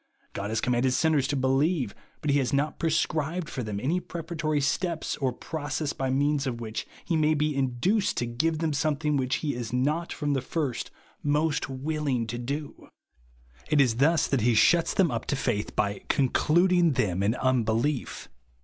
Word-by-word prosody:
God 100 +1 -4
has 110 0 -1
commanded 125 +1 +1
sinners 155 -2 +2
to 145 - -1
believe 135 - +1 0.3
but 150 - 0
he 145 - +3
has 125 -4 0
not 145 +2 0
prescribed 160 +1 0
for 130 - -4
them 105 -3 -4
any 155 - 0
preparatory 165 -3 -3
steps 160 +4 -1
or 135 -3 0
process 145 +2 -4
by 135 -1 -2
means 140 +1 +1
of 120 -2 -3
which 110 -1 -5 0.2
he 170 - 0
may 155 0 +3
be 150 0 0
induced 135 - +1
to 120 - 0
give 155 +8 0
them 160 -1 -1
something 150 0 0
ichich 130 0 -1
he 150 -2 -1
is 120 -2 -5
not 150 +7 0
from 145 -2 -1
the 135 - 0
first 140 -4 -3 0.3
most 150 +1 +1
vAlllng 135 -3 -2
to 120 +2 -4
do. 140 +4 -5 0.8
It 150 - +3
is 125 -5 +3
thus 155 +4 +3
that 135 -4 0
he 120 +1 +3
shuts 165 +10 +4
them 190 -5 +3
up 115 -1 -3
to - - 0
faith, 120 -6 -2
by 100 -1 0
"concluding 170 +5 +3
them 95 -6 0
in 105 +4 +1
unbelief." 125 +1 0
145 Hz, 180 wpm, -27 LUFS, 125-155 Hz, 0.8 s, shuts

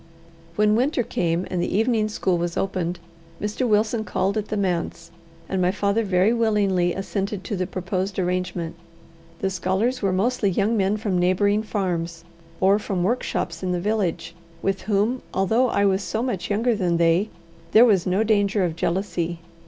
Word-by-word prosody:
When 210 0 +3
winter 255 +2 +1
came, 175 -5 -1
and 180 -2 0
the 185 - 0
evening 220 -1 +2
school 185 -4 0
was 170 0 -2
opened, 180 -2 -1 0.4
Mr. 210 +5 -1
Wilson 220 +1 +2
called 195 -1 -1
at 215 -1 -2
the 215 - -2
manse, 170 -3 -2 0.4
and 190 -1 -1
my 180 - +3
father 200 +3 +1
very 195 +2 +3
willingly 205 -6 +2
assented 195 +1 -3
to 205 - -3
the 185 -1 -2
proposed 185 +1 -3
arrangement. 180 -2 -2 0.7
The 195 - 0
scholars 190 +7 0
were 195 -2 +1
mostly 205 +3 +1
young 205 +5 +1
men 200 0 +1
from 205 -4 -1
neighbouring 200 +4 +2
farms, 175 -6 -3 0.4
or 195 +2 +4
from 190 -4 -2
workshops 185 -5 -1
in 185 -1 -1
the 175 - -1
village, 180 -4 -1 0.3
with 195 -1 0
whom, 215 +5 0
although 225 +7 +2
I 200 - +2
was 195 0 +2
so 220 +4 -2
much 240 -8 -3
younger 230 +4 +2
than 180 -4 +1
they, 170 +5 +3 0.4
there 230 +3 +8
was 195 -7 +3
no 190 +4 +2
danger 205 -2 +2
of 165 -2 -3
jealousy. 175 -1 -1
195 Hz, 170 wpm, -23 LUFS, 180-215 Hz, 0.7 s, there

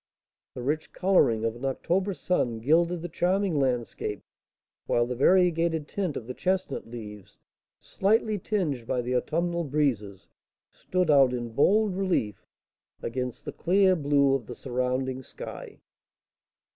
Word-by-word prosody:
The 125 - -6
rich 150 +4 -2
colouring 120 - +3
of 115 0 -1
an 120 - -11
October 180 +8 -1
sun 125 -12 0
gilded 165 +8 +2
the - - -3
charming 180 0 0
landscape, 120 -5 -2 0.6
while 120 - +2
the 125 - -3
variegated 165 +1 +3
tint 185 -7 -2
of 115 - -6
the 125 - -6
chestnut 185 -4 -2
leaves, 105 -4 -10 0.4
slightly 215 +1 +1
tinged 155 - -2
by 125 - -1
the 125 +1 -1
autumnal 170 +6 0
breezes, 120 - -1 0.4
stood 180 -3 0
out 135 -3 +5
in 120 -1 -3
bold 200 - +3
relief 175 - -1 0.6
against 125 0 -4
the - - -5
clear 185 +2 +3
blue 140 -3 +3
of 135 -5 -2
the 120 - -7
surrounding 130 +1 -2
sky. - - -9
145 Hz, 135 wpm, -27 LUFS, 125-180 Hz, 0.6 s, out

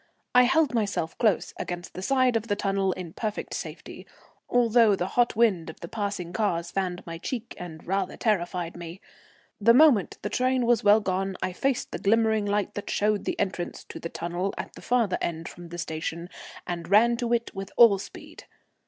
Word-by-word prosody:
I 250 0 +7
held 295 +1 +3
myself 200 -7 -1
close 215 -4 +1
against 175 0 -5
the 185 - -6
side 255 +2 +2
of 225 0 -1
the 205 - +1
tunnel 195 -1 0
in 175 -3 -8
perfect 215 -2 -4
safety, - - -7 0.4
although 230 -3 +4
the 185 0 -3
hot 240 -1 +2
wind 200 -8 +2
of 160 - -10
the 170 - -6
passing 200 -4 -4
cars 170 -6 -1
fanned 185 -1 -2
my 165 -1 -7
cheek 235 +4 -5
and 160 -3 -9
rather 190 0 -1
terrified 175 -5 -1
me. 170 +1 -8 0.6
The 230 +3 +5
moment 265 - +5
the - - -2
train 255 -1 +1
was 235 -2 +3
well 210 +1 +6
gone 190 -1 -2
I 185 - -2
faced 265 +6 -1
the - - -4
glimmering 220 0 +2
light 205 0 0
that 205 - -6
showed 210 0 +1
the - - -2
entrance 180 -2 -3
to - - -7
the 165 - -5
tunnel 175 +4 -3
at - - -6
the - - -12
further 235 -6 +1
end 165 -1 -3
from 175 -1 -10
the 175 - -7
station, 165 +1 -4 0.4
and 170 -1 -5
ran 230 +4 +5
to 240 0 -2
it 235 -1 0
with 195 0 -6
all 220 -5 +7
speed. - - -11
200 Hz, 195 wpm, -26 LUFS, 175-230 Hz, 0.6 s, I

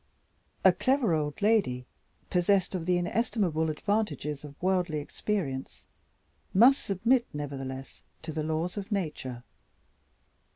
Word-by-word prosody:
A - - +9
clever 260 -7 +2
old 150 +3 -1
lady, 195 - +2 0.5
possessed 185 +1 +2
of 175 -2 -3
the 180 -1 +3
inestimable 175 -4 0
advantages 155 -5 -1
of 145 -1 -11
worldly 180 -4 +1
experience, 145 -3 -3 0.7
must 255 +8 +6
submit 230 +6 +2
nevertheless 135 -2 -6 0.2
to 160 - -4
the 155 - -2
laws 160 +5 -2
of 200 +1 -5
Nature. 150 - -3
175 Hz, 115 wpm, -29 LUFS, 150-205 Hz, 0.7 s, A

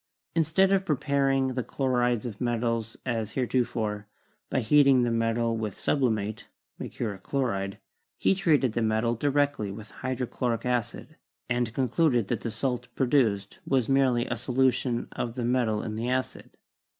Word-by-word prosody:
Instead 165 +4 +3
of 195 -1 +3
preparing 140 -4 +1
the 130 0 -2
chlorides 125 -3 0
of 110 -4 -6
metals 115 -2 -1
as 115 -4 -2
heretofore, 115 -5 -1 0.4
by - - +1
heating 135 +1 +5
the 120 - +1
metal 115 0 +1
with 110 -3 -4
sublimate 110 -6 0 0.3
(mercuric 100 -5 -4
chloride), 100 -8 -2 0.4
he - - +3
treated 155 - +2
the 120 - 0
metal 110 +1 +1
directly 140 -3 0
with 105 +2 -9
hydrochloric 125 -2 -2
acid, 125 -3 -2 0.3
and 120 -1 0
concluded 130 - +2
that - - -1
the 115 - -3
salt 125 +2 -2
produced 120 -7 +1
was 130 -4 +1
merely 130 -3 +3
a 120 - -2
solution 125 0 +1
of 120 -1 -4
the 125 -2 -2
metal 120 -3 +1
in 110 -1 -4
the 115 +3 -2
acid. 130 0 -2
120 Hz, 145 wpm, -27 LUFS, 115-135 Hz, 0.4 s, heating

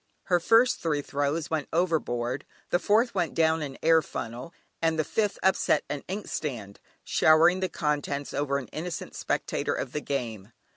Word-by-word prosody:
Her 180 -2 +2
first 230 +7 +4
three 150 -3 -1
throws 145 +4 -2
went 155 -3 -1
overboard, 145 -7 0 0.3
the 175 - +3
fourth 225 +5 +2
went 175 -4 -1
down 160 0 +3
an 140 -3 -5
air 165 0 +6
funnel, 125 0 -6 0.3
and 165 -1 +2
the 155 - +2
fifth 205 +6 -1
upset 190 -5 +3
an 145 -1 -4
ink 200 +3 -4
stand, 110 -9 -5 0.2
showering 165 +4 +5
the 185 -1 -1
contents 145 -2 -2
over 140 -1 0
an 140 - -5
innocent 165 0 -5
spectator - - -1
of - - -4
the 150 - -3
game. 115 -7 -4
155 Hz, 165 wpm, -27 LUFS, 140-175 Hz, 0.3 s, air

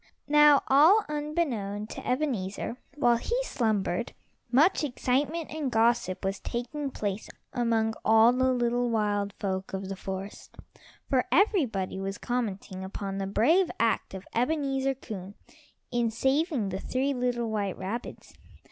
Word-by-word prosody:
Now 295 -1 +6
all 320 +11 +6
unbeknown 295 -10 -2
to - - -8
Ebenezer, 245 -5 -2 0.2
while 240 -5 +3
he 475 - -2
slumbered, 215 - -1 0.4
much 310 +8 +4
excitement 290 +4 -1
and 305 -4 -3
gossip 225 -5 +1
was 195 +1 -1
taking 275 +5 -4
place 205 -4 -4 0.2
among 225 -2 +1
all 225 +2 +6
the 260 +1 +2
little 245 0 +1
wild 205 -2 0
folk 190 -1 -4
of 190 0 -4
the 195 - -3
forest, 190 +1 -7 0.5
for 260 -2 +2
everybody 265 - +2
was 195 +1 -4
commenting 205 -6 -3
upon 195 0 -5
the 195 - -2
brave 315 - +3
act 225 -3 0
of 190 - -8
Ebenezer 270 +1 0
Coon 205 -6 -8 0.6
in 240 -1 +1
saving 265 - 0
the 190 0 -4
three 270 +6 -1
little 245 -3 -1
white 200 -3 -2
rabbits. 200 +6 -6
235 Hz, 135 wpm, -28 LUFS, 200-275 Hz, 0.6 s, Now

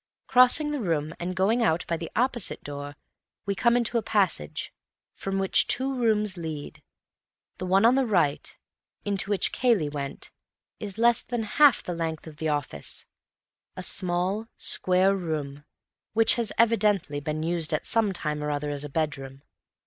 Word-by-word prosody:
Crossing 255 +4 +4
the 295 - -2
room 160 -5 -1
and 180 +1 -4
going 205 +6 +2
out 170 -6 +1
by 170 - -1
the 165 0 -6
opposite 240 -2 0
door, 145 0 -6 0.5
we 200 - 0
come 235 +4 +3
into 235 0 +1
a - - -4
passage, 195 - -1 0.4
from 195 0 -4
which 195 -1 +3
two 265 +2 +3
rooms 215 -6 +1
lead. 160 -3 -6 0.8
The 185 - -4
one 195 +3 +4
on 235 - +6
the 265 -1 +2
right, 170 -9 0 0.5
into 200 -1 -1
which 205 -2 +1
Cayley 225 - +2
went, 140 -2 -6 0.5
is 205 -2 -5
less 235 +1 +3
than 240 -2 -3
half 275 +4 +4
the 175 - -4
length 165 -2 -4
of 155 -2 -11
the 160 +1 -2
office, 145 - -3 0.7
a - - -6
small, 185 +5 -1
square 185 +2 +2
room, 150 -5 -4 0.5
which 225 0 +4
has 235 -3 -1
evidently 210 -9 +2
been 155 +2 -3
used 165 -2 0
some 225 -3 +2
time 150 -4 -3
or 150 - -2
other 145 0 -2
as 145 0 -4
a 145 - -6
bedroom. 135 -3 -3
185 Hz, 165 wpm, -26 LUFS, 150-225 Hz, 0.8 s, on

